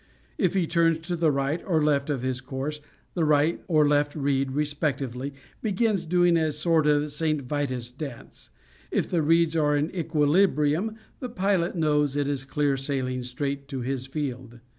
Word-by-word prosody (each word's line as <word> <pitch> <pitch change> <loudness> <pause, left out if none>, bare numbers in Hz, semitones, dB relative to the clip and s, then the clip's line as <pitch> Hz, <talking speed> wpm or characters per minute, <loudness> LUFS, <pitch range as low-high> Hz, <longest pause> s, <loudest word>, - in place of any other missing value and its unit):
If 185 -1 +2
he 185 -3 +2
turns 165 -1 +2
to 175 +2 -2
the 165 -2 +2
right 140 +4 -1
or 160 -5 +1
left 145 -1 +1
of 135 -4 -1
his 130 -1 -1
course 135 +3 -4 0.3
the 170 - 0
right 150 +2 +2
or 155 -4 +4
left 145 0 +2
reed, 135 -2 0
respectively, 140 -3 -2 0.3
begins 205 -3 0
doing 175 0 +4
a 160 -1 +1
sort 155 +1 +2
of 150 0 +2
St. 155 -1 -1
Vitus 130 -3 -2
dance. 135 -2 -9 0.4
If - - 0
the 170 - +1
reeds 165 +1 +3
are 150 -2 +2
in 150 +3 -1
equilibrium 160 +3 +2 0.2
the 250 - -5
pilot 190 -5 0
knows 150 -3 +1
it 145 -1 0
is 140 -2 -2
clear 140 0 0
sailing 130 -2 -2
straight 140 +3 -4
to 135 -3 -4
his 130 +1 -3
field. 130 -4 -5
150 Hz, 170 wpm, -26 LUFS, 140-165 Hz, 0.4 s, or